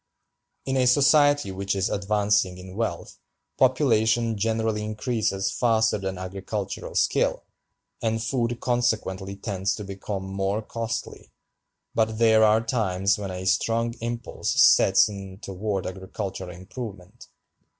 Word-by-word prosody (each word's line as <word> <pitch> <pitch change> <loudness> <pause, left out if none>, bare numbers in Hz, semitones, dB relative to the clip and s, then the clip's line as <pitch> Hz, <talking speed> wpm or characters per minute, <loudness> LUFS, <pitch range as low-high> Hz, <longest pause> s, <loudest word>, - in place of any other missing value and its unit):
In 135 0 0
a 130 -1 +3
society 145 -2 +4
which 100 +1 -2
is 95 -1 +1
advancing 100 -2 +1
in 90 0 -10
wealth, 105 -7 -4 0.4
population 115 -3 +3
generally 110 0 0
increases 110 -2 -1
faster 110 -3 +2
than 95 -1 -4
agricultural 95 +2 -5
skill, - - +1 0.6
and 115 -1 0
food 120 0 -1
consequently 105 -6 -1
tends 100 -1 -2
to 105 - -7
become 100 0 -5
more 95 +2 -2
costly; 115 +1 -5 0.6
but 110 -1 +1
there 110 -1 +5
are 110 +1 +5
times 100 -4 0
when 100 -2 -4
a 90 0 -5
strong 115 +4 +1
impulse 120 0 -3
sets - - +6
in 100 -2 -8
toward 100 -1 -3
agricultural 95 0 -5
improvement. 95 +2 -9
105 Hz, 120 wpm, -25 LUFS, 95-115 Hz, 0.6 s, sets